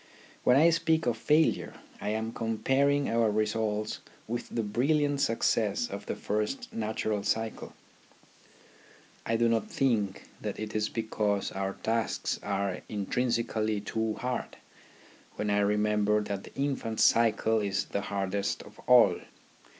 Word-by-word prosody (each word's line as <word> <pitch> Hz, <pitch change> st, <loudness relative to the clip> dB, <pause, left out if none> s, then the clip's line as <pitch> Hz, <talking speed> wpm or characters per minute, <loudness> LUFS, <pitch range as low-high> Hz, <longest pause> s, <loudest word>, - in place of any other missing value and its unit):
When 125 Hz, -, +5 dB
I 165 Hz, +4 st, +6 dB
speak 160 Hz, -1 st, +1 dB
of 120 Hz, -2 st, +1 dB
failure, 150 Hz, +7 st, +2 dB, 0.3 s
I 105 Hz, -, -2 dB
am 110 Hz, +1 st, -2 dB
comparing 135 Hz, +6 st, +1 dB
our 115 Hz, -1 st, +2 dB
results 105 Hz, 0 st, -1 dB, 0.3 s
with 120 Hz, +1 st, -4 dB
the 115 Hz, -, -2 dB
brilliant 140 Hz, +6 st, +1 dB
success 115 Hz, -1 st, +1 dB
of 100 Hz, +1 st, -6 dB
the -, -, -2 dB
first 105 Hz, +5 st, -3 dB
natural 110 Hz, -1 st, -1 dB
cycle. 110 Hz, +2 st, -2 dB, 1.5 s
I 115 Hz, -, +1 dB
do 115 Hz, +1 st, +3 dB
not 115 Hz, -2 st, +1 dB
think 110 Hz, -8 st, 0 dB, 0.2 s
that -, -, -4 dB
it 110 Hz, 0 st, -5 dB
is 110 Hz, 0 st, +1 dB
because 105 Hz, -3 st, -1 dB
our 95 Hz, 0 st, -2 dB
tasks 115 Hz, 0 st, -1 dB
are 100 Hz, -2 st, -2 dB
intrinsically 110 Hz, 0 st, 0 dB
too 110 Hz, +1 st, -2 dB
hard, 125 Hz, -1 st, -4 dB, 0.8 s
when 105 Hz, -1 st, -1 dB
I 100 Hz, -, +3 dB
remem 105 Hz, +1 st, +2 dB
ber 105 Hz, +1 st, +3 dB
that 100 Hz, -2 st, -4 dB
the -, -, -14 dB
infant's 135 Hz, -5 st, -1 dB
cycle 115 Hz, -1 st, +4 dB
is 100 Hz, -2 st, -1 dB
the 100 Hz, -, -3 dB
hardest 100 Hz, 0 st, -2 dB
of -, -, -16 dB
all. -, -, +6 dB
110 Hz, 140 wpm, -29 LUFS, 105-115 Hz, 1.5 s, I